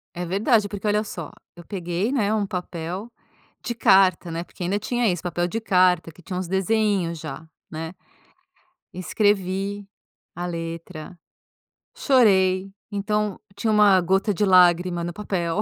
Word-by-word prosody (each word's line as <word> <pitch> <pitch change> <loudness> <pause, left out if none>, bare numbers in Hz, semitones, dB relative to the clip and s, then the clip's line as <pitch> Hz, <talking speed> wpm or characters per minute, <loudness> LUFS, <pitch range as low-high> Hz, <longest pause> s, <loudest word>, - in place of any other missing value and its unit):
É 175 0 -3
verdade, 205 +4 +2
porque 205 +1 -7
olha 210 +1 +2
só, 170 -5 -7 0.2
eu 175 - -12
peguei, 180 +4 -2
né, 215 -6 +1
um 210 -2 0
papel 180 +2 -5 0.5
de 240 - -2
carta, 190 -5 +4
né, 165 +1 -3
porque 175 - -9
ainda 195 +4 0
tinha 240 +2 0
isso, 180 -1 -2
papel 175 0 -1
de 225 +5 -3
carta 180 -5 +3
que 175 - -18
tinha 180 +1 -6
uns 185 -2 -3
desenhinhos 190 -3 +1
já, 160 +1 -8 0.2
né. 160 +2 -6 1.0
Escrevi 195 +1 -1 0.5
a 175 +1 -4
letra, 165 0 -7 0.8
chorei, 195 -7 +3 0.2
então 210 0 -1 0.2
tinha 220 +2 0
uma 205 -3 +6
gota 190 +4 +1
de 205 +3 +1
lágrima 180 -1 +4
no 175 0 -4
papel. 190 -2 -2
185 Hz, 145 wpm, -23 LUFS, 175-205 Hz, 1.0 s, uma